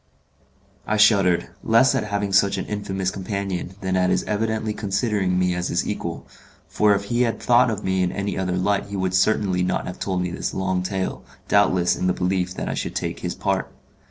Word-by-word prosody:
I 110 - +1
shuddered, 100 -4 +4
less 115 +4 +4
at - - 0
having 100 -1 -2
such 100 0 +4
an - - -3
infamous 95 -2 -2
companion 95 -1 -4
than 95 -1 -1
at 90 0 +2
his - - +1
evidently 110 0 -1
considering 100 -2 0
me 90 0 +2
as 90 0 -2
his 85 - -1
equal, 85 -5 -4 0.4
for 105 -1 +3
if 100 - -2
he 120 +4 -1
had 115 -2 +1
thought 125 0 +4
of 105 -2 -3
me 95 0 0
in 90 -1 +1
any 100 -1 -3
other 90 -1 -1
light 100 +2 0
he 100 - -6
would 95 -1 -1
certainly 95 -1 +2
not 90 - -1
have 90 - -7
told 95 -2 -1
me 90 - -3
this 90 - -4
long 95 -1 0
tale, 95 0 -3 0.2
doubtless 95 -3 +3
in 90 - -1
the 90 - +2
belief 90 0 -1
that - - -4
I - - -1
should - - -4
take - - -3
his - - -4
part. - - -1
95 Hz, 210 wpm, -23 LUFS, 90-105 Hz, 0.4 s, shuddered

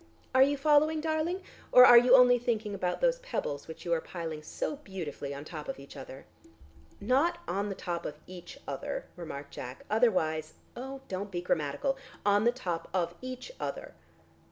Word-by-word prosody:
Are 260 - +5
you 285 +2 +5
following, 305 +2 +4
darling, 320 +4 -1 0.3
or 250 0 +10
are 245 - +9
you 245 +2 +8
only 250 -1 +7
thinking 225 -3 -1
about 180 -2 -2
those - - +3
pebbles 325 - -4
which 160 +2 -9
you 170 - +1
are 165 - +1
piling 165 -3 -6
so 215 - -4
beautifully 175 - -6
on 140 0 -6
the - - -12
top 155 -3 -6
of - - -4
each 140 0 -12
other?" - - -9 0.7
"Not 275 +11 +2
on 200 +3 -1
the 195 - -4
top 170 -2 -4
of 150 - -7
each 180 -1 -10
other," - - -4
remarked 145 -5 -8
Jack. 125 +1 -8
"Otherwise 160 -9 +1
" - - -33
"Oh, 265 +2 -7
don't 195 +2 -4
be 180 -2 -3
grammatical. 165 - -1 0.3
On 205 +1 +4
the 240 - +5
top 175 -9 -4
of 170 -2 0
each 255 - -7
other." - - -5
205 Hz, 185 wpm, -30 LUFS, 165-265 Hz, 0.7 s, or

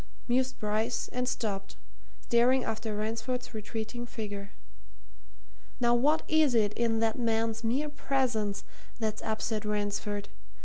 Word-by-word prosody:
mused 255 +1 +2
Bryce, 220 +2 0
and 250 0 -1
stopped, 200 -5 -2 0.5
staring 245 +2 +4
after 220 -1 -2
Ransford's 230 +4 -2
retreating 225 +3 -4
figure. 205 -3 -5 1.3
"Now 240 -1 +4
what 290 +6 +4
is 310 -5 +4
it 210 -2 +3
in 225 -1 +1
that 225 +2 +1
man's 225 -1 +1
mere 260 +7 +1
presence 240 -8 0 0.3
that's 215 -2 -1
upset 220 0 -1
Ransford? 205 -1 -1
225 Hz, 120 wpm, -30 LUFS, 215-245 Hz, 1.3 s, staring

